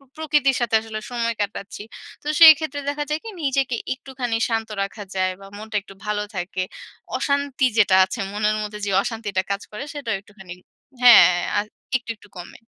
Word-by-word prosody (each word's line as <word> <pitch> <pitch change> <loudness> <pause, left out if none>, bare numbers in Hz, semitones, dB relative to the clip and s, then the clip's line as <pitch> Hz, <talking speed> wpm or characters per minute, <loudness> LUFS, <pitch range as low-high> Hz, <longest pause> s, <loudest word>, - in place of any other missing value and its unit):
প - - -24
প্রকৃতির 295 -4 +2
সাথে 235 -2 0
আসলে 220 -1 -6
সময় 235 -1 -1
কাটাচ্ছি। 200 0 -4 0.4
তো - - -18
সেই 320 -1 +12
ক্ষেত্রে 290 -2 -4
দেখা 290 +1 -1
যায় 305 +1 -1
কি 450 - -6
নিজেকে 270 -3 0 0.2
একটুখানি 255 -3 -4
শান্ত 225 -1 -1
রাখা 200 +1 -5
যায় 185 0 +1
বা 195 - -11
মনটা 215 +1 -6
একটু 195 - -14
ভালো 210 0 -1
থাকে। 185 +1 -3 0.6
অশান্তি 280 -2 0
যেটা 195 -3 +5
আছে, 190 +5 -6
মনের 210 +1 0
মধ্যে 210 0 -6
যেই 200 - -1
অশান্তিটা 215 -5 -2
কাজ 200 +1 -1
করে 210 +6 -5
সেটাও 255 -7 -3
একটুখানি 195 -3 -13 0.5
হ্যাঁ 245 -7 +10 0.3
আ - - +4 0.4
একটু, 240 -2 -6
একটু 205 - -19
কমে। 175 - -10
225 Hz, 180 wpm, -22 LUFS, 205-270 Hz, 0.6 s, সেই